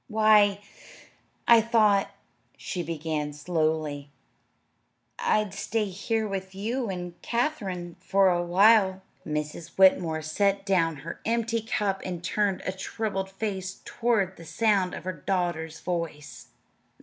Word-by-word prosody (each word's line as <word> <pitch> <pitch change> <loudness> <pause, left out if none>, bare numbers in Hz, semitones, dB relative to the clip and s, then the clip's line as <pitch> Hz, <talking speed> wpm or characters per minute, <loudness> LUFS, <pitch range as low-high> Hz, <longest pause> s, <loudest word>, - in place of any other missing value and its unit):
"Why, 210 -3 +4 0.9
I 235 -1 +8
thought," 215 -3 +3 0.5
she 180 - -4
began 155 -2 -3
slowly, 155 -2 -1 1.1
"I'd 210 -2 +1
stay 210 +1 -2
here 220 +4 -2
with 190 -1 -5
you 230 +4 -2
and 180 -2 -6
Katherine 200 - -2 0.2
a 190 -3 +4
while." 190 +1 +4 0.2
Mrs. 150 +1 -4
Whitmore 170 -4 +4
set 195 +5 0
down 170 -5 +2
her 165 - -6
empty 230 0 0
cup 205 -3 -1
and 175 -2 -5
turned 200 +1 0
a - - 0
troubled 195 0 -3
face 190 -2 -4
toward 220 -6 0
the 165 - -11
sound 190 +2 +1
of - - -8
her 185 +1 -3
daughter's 165 -1 -2
voice. 165 -5 -5
190 Hz, 120 wpm, -27 LUFS, 170-210 Hz, 1.1 s, I